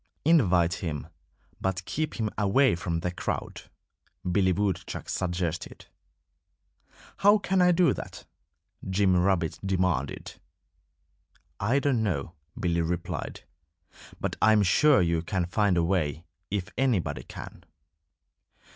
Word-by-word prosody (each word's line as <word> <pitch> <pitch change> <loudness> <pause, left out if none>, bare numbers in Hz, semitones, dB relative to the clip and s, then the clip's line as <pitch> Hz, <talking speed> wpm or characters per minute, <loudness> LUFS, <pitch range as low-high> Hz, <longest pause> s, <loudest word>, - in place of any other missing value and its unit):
"Invite 90 - +4
him; 75 -4 -4 0.5
but 95 -1 -2
keep 155 0 -3
him 110 -2 -2
away 115 +7 +3
from 85 -1 -2
the 90 - -2
crowd!" 90 - -5 0.6
Billy 95 0 +3
Woodchuck 95 -1 -2
suggested. 90 -2 -3 1.3
"How 205 +2 +6
can 190 -2 +1
I 180 0 +5
do 175 0 +4
that?" - - -8 0.6
Jimmy 95 -1 +3
Rabbit 90 -3 +1
demanded. 90 -7 -1 1.2
"I 115 +7 +1
don't 140 -4 +1
know," 85 -7 -2 0.3
Billy 85 -2 +1
replied. 85 +1 -3 0.8
"But - - -3
I 110 - +6
am 105 -1 +4
sure 135 +5 +5
you 85 -1 +1
can 90 +1 -1
find 95 +1 +1
a 85 - +3
way, 85 -3 -1 0.2
if 95 -2 -2
anybody 125 -10 +1
can." - - -10
95 Hz, 120 wpm, -27 LUFS, 85-110 Hz, 1.3 s, How